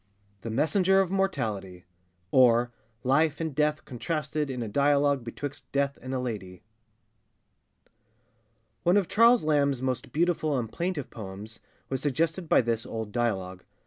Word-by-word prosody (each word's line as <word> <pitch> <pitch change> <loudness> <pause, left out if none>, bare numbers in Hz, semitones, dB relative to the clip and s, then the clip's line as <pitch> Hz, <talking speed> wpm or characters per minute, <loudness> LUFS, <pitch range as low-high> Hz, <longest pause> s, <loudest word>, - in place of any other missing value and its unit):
THE 115 - -5
MESSENGER 185 - +3
OF 190 -2 +1
MORTALITY; 105 - -2 0.5
OR 120 -1 +5 0.3
LIFE 150 +4 +2
AND 160 -2 -2
DEATH 150 +1 0
CONTRASTED 150 +2 -3
IN 125 -2 -3
A - - -4
DIALOGUE 140 +2 +2
BETWIXT 140 +4 -7
DEATH 140 0 0
AND 130 +1 -4
A - - -1
LADY. 100 -7 -5 2.2
[ONE 175 +3 +4
of 195 -4 +2
Charles 230 0 +5
Lamb's 140 -3 +2
most 130 -2 -2
beautiful 155 -3 +1
and 115 -3 -3
plaintive 170 -1 -3
poems 105 +1 -8 0.3
was 135 -1 -2
suggested 160 +5 -1
by - - +6
this 115 -1 -1
old 110 -2 -5
dialogue. 95 -6 -2
140 Hz, 140 wpm, -27 LUFS, 115-155 Hz, 2.2 s, by